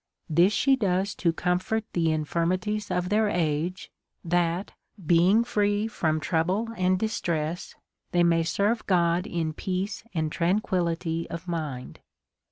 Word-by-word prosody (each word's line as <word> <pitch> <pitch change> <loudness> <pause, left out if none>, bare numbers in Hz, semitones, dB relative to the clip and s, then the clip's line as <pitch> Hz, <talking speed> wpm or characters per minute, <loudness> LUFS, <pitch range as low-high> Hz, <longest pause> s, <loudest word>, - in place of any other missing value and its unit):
This 170 +5 +4
she 270 +5 +3
does 195 -4 0
to 170 - +2
comfort 180 +6 -1
the 165 -2 +2
infirmities 180 +7 -1
of 180 0 -1
their 210 +1 +2
age, 165 +1 -1 0.3
that, 175 +2 0 0.3
being 180 +7 +4
free 205 -2 +1
from 160 -7 0
trouble 185 +8 0
and 185 -2 +2
distress, 170 -6 -2 0.4
they 175 0 +3
may 170 -1 +3
serve 200 +7 0
God 175 0 +2
in 160 -2 -2
peace 185 +4 -3
and 155 -2 0
tranquillity 170 -3 0
of 170 +2 -7
mind. 150 -7 -4
175 Hz, 130 wpm, -26 LUFS, 165-200 Hz, 0.4 s, This